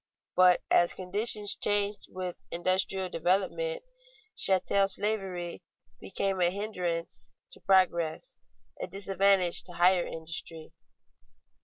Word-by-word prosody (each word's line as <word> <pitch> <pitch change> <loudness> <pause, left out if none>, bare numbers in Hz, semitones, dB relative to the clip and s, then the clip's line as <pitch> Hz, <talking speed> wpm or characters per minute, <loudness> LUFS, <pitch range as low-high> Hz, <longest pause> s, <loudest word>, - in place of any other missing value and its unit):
But 180 -1 +4
as 175 - +3
conditions 205 +3 +1
changed 205 0 0
with 185 -1 -7
industrial 185 +2 0
development, 195 - -1 0.5
chattel 195 +1 +2
slavery 190 -4 -1 0.4
became 195 -1 -2
a 175 - +4
hindrance 180 -4 -4 0.2
to - - -8
progress, 185 - +1 0.5
a - - -4
disadvantage 195 -1 +2
to 180 - -8
higher 180 +1 +3
industry. 165 0 -7
185 Hz, 100 wpm, -28 LUFS, 175-200 Hz, 0.5 s, But